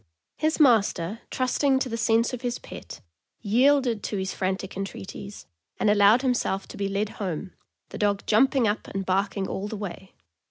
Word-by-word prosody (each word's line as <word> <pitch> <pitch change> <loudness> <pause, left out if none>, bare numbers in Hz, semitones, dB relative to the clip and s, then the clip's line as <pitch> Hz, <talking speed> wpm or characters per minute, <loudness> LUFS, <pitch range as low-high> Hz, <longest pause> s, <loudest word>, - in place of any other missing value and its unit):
His 310 +1 0
master, 220 - +3
trusting 265 +2 +1
to 265 - -1
the 230 - -3
sense 230 +1 +2
of 245 - -4
his 245 -1 -2
pet, - - -10 0.4
yielded 245 +1 +3
to 205 - -3
his 190 0 -2
frantic 190 0 -3
entreaties, 195 +1 -7 0.3
and 210 - +3
allowed 210 +4 +5
himself 240 -7 0
to - - -9
be 200 - -1
led 200 +2 -1
home, 185 -1 -4 0.4
the - - -8
dog 205 -1 +1
jumping 250 +2 +3
up 205 +1 -2
and 195 -1 -4
barking 195 +1 0
all 195 +2 -4
the 215 - -5
way. 190 -1 -7
210 Hz, 170 wpm, -26 LUFS, 195-245 Hz, 0.4 s, allowed